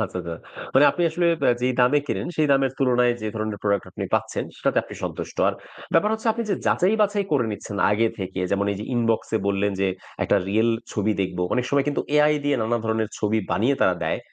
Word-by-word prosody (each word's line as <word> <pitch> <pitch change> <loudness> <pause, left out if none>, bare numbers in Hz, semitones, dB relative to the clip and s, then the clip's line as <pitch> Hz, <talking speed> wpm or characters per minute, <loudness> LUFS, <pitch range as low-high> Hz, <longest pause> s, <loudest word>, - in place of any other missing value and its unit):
আচ্ছা, - - -6
আচ্ছা। 85 -1 -5 0.4
মানে 135 - +7
আপনি 175 - -2
আসলে 170 +2 0 0.2
আ - - +6
যেই 130 +1 +2
দামে 125 +4 +4
কেনেন, - - -2
সেই 155 - +3
দামের 135 -1 +2
তুলনায় 125 -2 +3
যে, 110 - -4
ধরনের 110 -1 -3
প্রোডাক্ট 100 -1 +1
আপনি - - -5
পাচ্ছেন, - - -1
সেটাতে - - +1
আপনি - - -10
সন্তুষ্ট। - - -5
আর - - -1 0.4
ব্যাপার 185 +6 +3
হচ্ছে 220 +1 -4
আপনি 230 +1 -3
যে, - - +3
যাচাই 185 +4 +3
বাছাই 205 -1 +1
করে 135 -5 +3
নিচ্ছেন 105 0 -7
আগে 110 +2 +2
থেকে। 95 0 -4
যেমন 100 0 +1
এই 100 - -5
যে, 105 - -4
ইনবক্সে 115 -1 0
বললেন 100 0 +1
যে, 95 - +2 0.4
একটা - - +3
রিয়াল 110 +3 +2 0.2
ছবি 105 +1 0
দেখব। 95 -2 -2 0.2
অনেক 125 -1 0
সময় 140 -1 +2
কিন্তু 145 - 0
AI 150 0 +5
দিয়ে 145 -1 +2
নানা 120 +2 0
ধরনের 110 -1 0
ছবি 110 +1 +1
বানিয়ে 120 +7 +2
তারা 95 - +4
দেয়, - - -1
115 Hz, 220 wpm, -23 LUFS, 105-145 Hz, 0.4 s, মানে